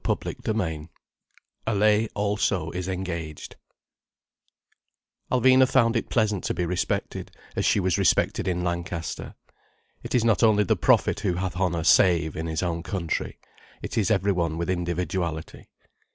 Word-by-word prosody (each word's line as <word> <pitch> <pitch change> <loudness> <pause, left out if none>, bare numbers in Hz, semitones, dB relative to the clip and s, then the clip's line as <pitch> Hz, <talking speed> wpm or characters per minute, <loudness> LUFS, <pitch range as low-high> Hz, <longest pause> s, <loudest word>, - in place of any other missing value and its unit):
CHAPTER - - -1
XII 80 -9 -2 0.8
ALLAYE 105 +1 +3
ALSO 100 -5 0
IS 90 0 -4
ENGAGED 85 -5 -5 1.8
Alvina 130 +1 +5
found 115 -3 +3
it 115 - -1
pleasant 105 -4 +1
to - - -1
be 90 - -1
respected 90 +1 -2 0.3
as - - 0
she - - +3
was 95 -2 +1
respected - - +2
in 90 -1 -1
Lancaster. 85 -1 -4 0.7
It - - -4
is 120 -2 +2
not 110 -5 +3
only 105 -2 +5
the 95 - +2
prophet - - +2
who 100 -4 -1
hath 95 +1 -3
honour 90 -3 0
save 85 -2 +4
in 80 +1 -4
his 80 +2 -2
own 85 -2 -2
country: 85 -2 -3 0.5
it - - -5
is 110 -2 +1
every 100 -2 +2
one 85 -3 -1
with 85 +2 -1
individuality. 85 -2 -3
90 Hz, 145 wpm, -25 LUFS, 85-105 Hz, 1.8 s, Alvina